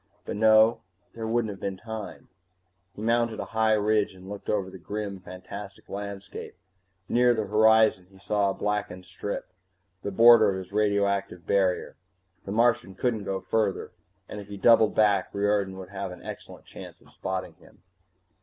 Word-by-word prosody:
But -, -, -4 dB
no, 110 Hz, +1 st, +5 dB, 0.3 s
there 115 Hz, -1 st, -5 dB
wouldn't 115 Hz, -1 st, 0 dB
have 100 Hz, -, -10 dB
been 95 Hz, -1 st, -4 dB
time 110 Hz, 0 st, -8 dB, 0.7 s
He 105 Hz, -, -7 dB
mounted 115 Hz, 0 st, +1 dB
a -, -, -3 dB
high 110 Hz, 0 st, +3 dB
ridge 105 Hz, -1 st, +1 dB
and 95 Hz, 0 st, -13 dB
looked 100 Hz, 0 st, -8 dB
over 95 Hz, -3 st, -1 dB
the 95 Hz, -, -11 dB
grim, 100 Hz, +1 st, -5 dB
fantastic 95 Hz, +2 st, -10 dB
landscape. 100 Hz, -1 st, -7 dB, 0.5 s
Near 120 Hz, 0 st, +3 dB
the 110 Hz, -2 st, -1 dB
horizon 110 Hz, -2 st, +4 dB
he 95 Hz, -, -19 dB
saw 100 Hz, +1 st, 0 dB
a -, -, -1 dB
blackened 105 Hz, -3 st, -3 dB
strip, 95 Hz, 0 st, -6 dB, 0.5 s
the 100 Hz, -, -3 dB
border 115 Hz, +1 st, +7 dB
of 95 Hz, -, -1 dB
his 95 Hz, +1 st, -9 dB
radioactive 100 Hz, -3 st, 0 dB
barrier. 95 Hz, -2 st, 0 dB, 0.5 s
The 100 Hz, -, -5 dB
Martian 115 Hz, -3 st, +2 dB
couldn't 115 Hz, -4 st, -1 dB
go 95 Hz, -1 st, -3 dB
further, 105 Hz, -2 st, -1 dB, 0.4 s
and 105 Hz, -, -7 dB
if 100 Hz, -, -12 dB
he 100 Hz, 0 st, -8 dB
doubled 115 Hz, 0 st, +5 dB
back 100 Hz, -3 st, +3 dB
Riordan 100 Hz, -1 st, 0 dB
would 95 Hz, -1 st, -9 dB
have 100 Hz, -1 st, -5 dB
an 90 Hz, -, -11 dB
excellent -, -, -9 dB
chance -, -, -11 dB
of -, -, -22 dB
spotting -, -, -4 dB
him. -, -, -21 dB
100 Hz, 170 wpm, -26 LUFS, 95-110 Hz, 0.7 s, border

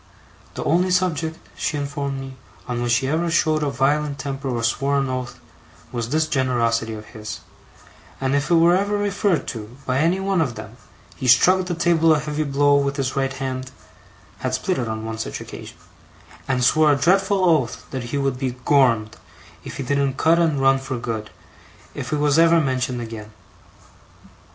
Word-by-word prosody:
The -, -, -4 dB
only 180 Hz, +4 st, +2 dB
subject, 165 Hz, -3 st, 0 dB, 0.2 s
she 150 Hz, -, -2 dB
informed 140 Hz, -1 st, -3 dB
me, 135 Hz, 0 st, -8 dB, 0.3 s
on 120 Hz, -1 st, -2 dB
which 120 Hz, -1 st, +2 dB
he 130 Hz, +2 st, 0 dB
ever 165 Hz, +4 st, 0 dB
showed 155 Hz, -2 st, +2 dB
a 145 Hz, -, 0 dB
violent 140 Hz, +2 st, 0 dB
temper 135 Hz, 0 st, -4 dB
or 120 Hz, -2 st, -2 dB
swore 135 Hz, +4 st, +1 dB
an 135 Hz, -1 st, 0 dB
oath, 130 Hz, -1 st, -4 dB, 0.5 s
was 120 Hz, -1 st, -3 dB
this 155 Hz, +3 st, +1 dB
generosity 120 Hz, -5 st, 0 dB
of 105 Hz, 0 st, -9 dB
his; 110 Hz, -2 st, -8 dB, 0.8 s
and 135 Hz, 0 st, 0 dB
if 140 Hz, 0 st, 0 dB
it 175 Hz, -, +4 dB
were 170 Hz, +1 st, +5 dB
ever 200 Hz, +2 st, 0 dB
referred 200 Hz, -6 st, 0 dB
to, 115 Hz, +1 st, -8 dB
by 130 Hz, +1 st, 0 dB
any 170 Hz, +5 st, +2 dB
one 195 Hz, -2 st, +1 dB
of 130 Hz, -7 st, -1 dB
them, 110 Hz, +2 st, -10 dB, 0.4 s
he 130 Hz, -, -3 dB
struck 180 Hz, +10 st, +5 dB
the 175 Hz, -, -2 dB
table 165 Hz, -1 st, +3 dB
a -, -, 0 dB
heavy 150 Hz, 0 st, -3 dB
blow 145 Hz, 0 st, +3 dB
with 140 Hz, 0 st, 0 dB
his 135 Hz, -2 st, -2 dB
right 135 Hz, -1 st, 0 dB
hand 130 Hz, -1 st, -4 dB, 0.7 s
(had 130 Hz, 0 st, -1 dB
split 180 Hz, +7 st, -1 dB
it 120 Hz, -, -2 dB
on 110 Hz, 0 st, -4 dB
one 110 Hz, 0 st, -5 dB
such -, -, -4 dB
occasion), -, -, -10 dB, 0.7 s
and 130 Hz, -1 st, 0 dB
swore 155 Hz, +4 st, +4 dB
a -, -, +4 dB
dreadful 190 Hz, +5 st, +2 dB
oath 150 Hz, -9 st, +1 dB
that 130 Hz, -3 st, -4 dB
he 120 Hz, +4 st, -3 dB
would 135 Hz, -2 st, -1 dB
be 130 Hz, -2 st, -2 dB
'Gormed' 115 Hz, -7 st, +3 dB, 0.5 s
if -, -, -8 dB
he 140 Hz, -, -3 dB
didn't 140 Hz, 0 st, 0 dB
cut 165 Hz, +1 st, +3 dB
and 160 Hz, -4 st, +2 dB
run 135 Hz, 0 st, +4 dB
for 135 Hz, -1 st, -4 dB
good, 115 Hz, -2 st, -4 dB, 0.6 s
if -, -, -6 dB
it 150 Hz, -, +1 dB
was 145 Hz, +1 st, +3 dB
ever 165 Hz, 0 st, +6 dB
mentioned 130 Hz, -4 st, -1 dB
again. 110 Hz, -2 st, -8 dB
140 Hz, 190 wpm, -22 LUFS, 125-160 Hz, 0.8 s, ever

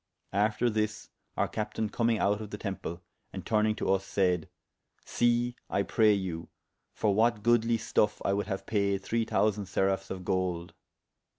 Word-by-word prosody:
After 105 Hz, +4 st, +2 dB
this 110 Hz, -1 st, -2 dB, 0.3 s
our -, -, +2 dB
captayne 110 Hz, 0 st, -2 dB
commyng 115 Hz, -1 st, +1 dB
out 105 Hz, +1 st, +1 dB
of 105 Hz, -, -7 dB
the 105 Hz, -, -6 dB
temple, 95 Hz, -4 st, -5 dB, 0.3 s
and -, -, -7 dB
turnyng 110 Hz, -1 st, +2 dB
to -, -, -3 dB
vs, 95 Hz, 0 st, +2 dB
sayd, 90 Hz, -4 st, +1 dB, 0.6 s
See 120 Hz, 0 st, +1 dB
(I 100 Hz, -, +1 dB
pray 110 Hz, +1 st, +4 dB
you) 90 Hz, -4 st, -3 dB, 0.4 s
for 105 Hz, -2 st, +1 dB
what 110 Hz, 0 st, +2 dB
goodly 120 Hz, 0 st, +3 dB
stuffe 105 Hz, -1 st, +1 dB
I 100 Hz, -, +2 dB
would 100 Hz, +1 st, -1 dB
haue 95 Hz, -2 st, -4 dB
paide 100 Hz, -2 st, 0 dB
three 115 Hz, +1 st, 0 dB
thousande 105 Hz, -3 st, +1 dB
seraphes 95 Hz, +1 st, 0 dB
of 95 Hz, -1 st, -6 dB
golde. 90 Hz, -2 st, -1 dB
105 Hz, 165 wpm, -29 LUFS, 95-110 Hz, 0.6 s, pray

